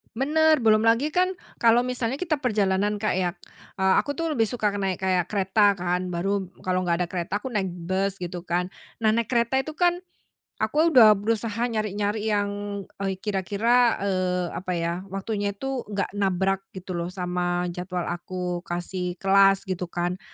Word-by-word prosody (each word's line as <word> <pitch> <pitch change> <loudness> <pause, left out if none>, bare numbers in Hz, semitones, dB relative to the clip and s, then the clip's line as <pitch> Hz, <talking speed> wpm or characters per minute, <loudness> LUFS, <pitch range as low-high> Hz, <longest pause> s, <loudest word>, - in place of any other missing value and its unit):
Bener, 310 +4 +3
belum 220 -2 +4
lagi 230 +5 +3
kan 365 +4 +1 0.2
kalau 235 +2 +4
misalnya 250 +1 -2
kita 335 -4 0
perjalanan 210 -5 0
Kak, 215 -2 0
ya, 180 -1 0 0.5
eee, 190 0 +4
aku 285 - +1
tuh 320 +1 -2
lebih 225 - +3
suka 220 -1 -1
naik 195 -2 -1
kayak 185 -2 +1
kereta 205 +1 +3
kan. 180 -1 -2
Baru 190 +2 -1 0.2
kalau 185 0 +1
nggak 170 -1 0
ada - - -4
kereta 180 +3 -3
aku 260 - -6
naik 205 -7 -1
bus 185 +3 -2
gitu 175 -1 -5
kan. 180 0 -1 0.3
Nah, 220 -1 +3
naik 235 0 -1
kereta 235 +1 +2
itu 310 - -6
kan 350 +2 +1 0.6
aku 320 +2 +2
udah 225 -7 +8
berusaha 220 +2 -1
nyari-nyari 210 0 -1
yang, 205 -1 -2 0.2
eee, 195 -1 -1
kira-kira, 210 +5 +2
eee, 185 -2 0
apa 180 0 -3
ya, 170 0 -1
waktunya 200 +1 -3
itu 270 +3 -4
nggak 205 -1 -2
nabrak 195 -1 0 0.2
gitu 190 0 -7
loh 170 -1 -2
sama 180 -1 -2
jadwal 180 0 -4
aku 180 +1 -4
kasih 175 +1 -3
kelas 195 0 +5
gitu 185 -2 -3
kan. 175 +1 -2
195 Hz, 170 wpm, -25 LUFS, 180-225 Hz, 0.6 s, udah